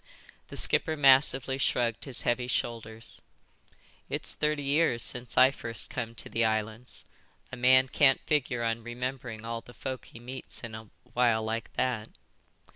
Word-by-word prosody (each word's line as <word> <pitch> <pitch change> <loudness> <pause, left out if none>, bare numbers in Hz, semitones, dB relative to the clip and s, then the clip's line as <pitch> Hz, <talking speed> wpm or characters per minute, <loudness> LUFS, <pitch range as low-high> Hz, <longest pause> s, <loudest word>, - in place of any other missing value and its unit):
The - - -9
skipper 160 -1 +3
massively 135 -1 +5
shrugged 120 -4 0
his 135 -3 -2
heavy 120 +1 0
shoulders. 115 -2 -4 0.9
"It's - - 0
thirty 150 -1 -1
years 140 -5 +2
since 125 -1 -2
I 130 - +7
first 120 -4 +1
come 115 -2 -4
to - - -5
the 115 - 0
islands. 110 +2 -2 0.5
A - - -5
man 130 +1 +5
can't 135 0 +4
figure 130 -5 0
on 115 0 -1
remembering 120 -1 -5
all 115 0 -4
the 120 - -16
folk 130 -2 -5
he 115 - -13
meets 125 +2 -7
in 115 -1 -7
a 110 -1 -9 0.2
while 120 -3 +2
like 110 0 -4
that." 120 -4 -1
120 Hz, 155 wpm, -29 LUFS, 115-130 Hz, 0.9 s, I